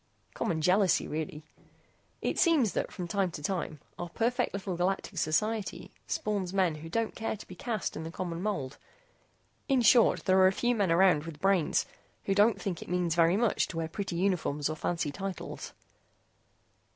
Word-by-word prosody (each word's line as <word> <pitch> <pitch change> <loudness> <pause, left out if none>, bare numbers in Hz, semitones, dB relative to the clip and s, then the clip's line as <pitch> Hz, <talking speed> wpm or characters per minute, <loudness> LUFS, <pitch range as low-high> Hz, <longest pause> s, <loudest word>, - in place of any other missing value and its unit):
Common 160 -2 -1
jealousy, 185 +1 +3
really. 155 0 -4 0.8
It - - -1
seems 300 - +4
that - - -2
from 180 - -5
time 195 +1 0
to 150 - -7
time, 165 -3 -2 0.2
our 175 - -4
perfect 245 +6 0
little 195 -2 -4
galactic 185 +3 -1
society 185 +2 -1 0.2
spawns 200 -4 -2
men 185 -4 +2
who 160 +2 -9
don't 225 +5 -1
care 225 -1 -3
to - - -12
be - - -9
cast 235 -8 -3
in - - -4
the 160 - -5
common 170 0 -4
mold. 180 -10 -3 0.9
In 265 -3 +3
short, 235 0 +5
there 190 -1 +4
are 185 - +7
a - - +4
few 240 +4 +1
men 200 -7 +1
around 170 -3 +4
with 160 -3 -8
brains 195 -3 +2 0.4
who 195 - 0
don't 205 +3 +4
think 180 -4 -3
that - - -8
it - - -7
means 180 -2 +1
very 170 +2 +4
much 230 -1 +2
to 165 - -7
wear 165 -1 -1
pretty 195 +1 -4
uniforms 170 -6 0
or 155 - -2
fancy 160 -1 -2
titles." 195 +3 -6
185 Hz, 185 wpm, -30 LUFS, 165-205 Hz, 0.9 s, are